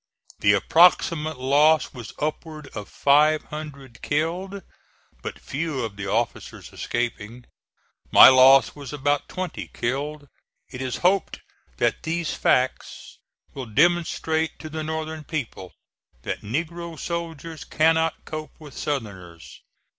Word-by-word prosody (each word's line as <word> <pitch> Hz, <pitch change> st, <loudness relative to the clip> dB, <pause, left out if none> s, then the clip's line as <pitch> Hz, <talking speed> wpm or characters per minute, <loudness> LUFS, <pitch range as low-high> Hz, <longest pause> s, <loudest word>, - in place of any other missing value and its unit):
The 100 Hz, -, +4 dB
approximate 155 Hz, -, +3 dB
loss 145 Hz, +4 st, +3 dB
was 120 Hz, -6 st, -9 dB
upward 155 Hz, 0 st, -5 dB
of 105 Hz, -, -7 dB
five 150 Hz, +2 st, +3 dB
hundred 140 Hz, -5 st, -9 dB
killed, 180 Hz, +6 st, -2 dB, 0.6 s
but -, -, -6 dB
few 145 Hz, -2 st, -4 dB
of 105 Hz, -3 st, -7 dB
the 100 Hz, -1 st, -6 dB
officers 115 Hz, +4 st, -3 dB
escaping. 120 Hz, 0 st, -4 dB, 0.7 s
My -, -, +10 dB
loss 130 Hz, +1 st, +7 dB
was 140 Hz, -3 st, -9 dB
about 145 Hz, 0 st, -1 dB
twenty 185 Hz, -2 st, -5 dB
killed. 145 Hz, +4 st, -4 dB, 0.4 s
It 130 Hz, 0 st, -7 dB
is 130 Hz, -2 st, -3 dB
hoped 190 Hz, +2 st, +1 dB, 0.4 s
that -, -, 0 dB
these 165 Hz, 0 st, -2 dB
facts 130 Hz, +1 st, -1 dB, 0.3 s
will 130 Hz, -3 st, -6 dB
demonstrate 160 Hz, +3 st, +1 dB
to 155 Hz, -, -9 dB
the 155 Hz, 0 st, -4 dB
Northern 160 Hz, 0 st, -4 dB
people 130 Hz, -, -5 dB, 0.5 s
that -, -, -4 dB
negro 165 Hz, +8 st, -4 dB
soldiers 165 Hz, -2 st, -5 dB
cannot 160 Hz, +1 st, +1 dB
cope 155 Hz, -2 st, -7 dB
with 150 Hz, -4 st, -12 dB
Southerners." 95 Hz, -, -6 dB
150 Hz, 120 wpm, -24 LUFS, 130-160 Hz, 0.7 s, My